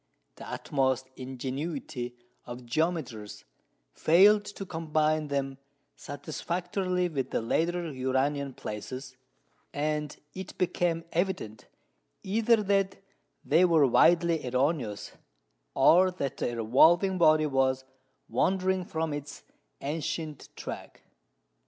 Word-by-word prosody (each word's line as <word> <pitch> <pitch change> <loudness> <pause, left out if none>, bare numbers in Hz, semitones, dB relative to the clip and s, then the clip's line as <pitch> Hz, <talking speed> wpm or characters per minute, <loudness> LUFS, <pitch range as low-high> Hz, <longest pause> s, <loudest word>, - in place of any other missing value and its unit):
The - - -9
utmost 130 -2 -1
ingenuity 130 0 -5 0.3
of 120 0 -8
geometers 130 -6 -2 0.5
failed 205 +6 +5
to 205 -1 -7
combine 155 -2 0
them 135 -1 -2 0.4
satisfactorily 180 +5 -2
with 135 -6 -3
the - - 0
later 165 +7 -1
Uranian 130 +1 -1
places, 130 +5 -7 0.6
and 150 0 -2 0.2
it 190 -1 -8
became 175 -2 0
evident, 170 - -2 0.6
either 220 +2 +2
that 195 -1 +1 0.5
they 160 +5 +4
were 165 -5 +5
widely 170 +5 +4
erroneous, 125 -4 -1 0.6
or 175 +7 +6
that 140 -7 -4
the 120 - -2
revolving 165 - +4
body 155 -2 +5
was 135 -2 +1 0.4
wandering 185 +9 +1
from 160 -2 -2
its 145 0 -7 0.4
ancient 155 0 -4
track. - - -8
155 Hz, 100 wpm, -29 LUFS, 130-175 Hz, 0.6 s, or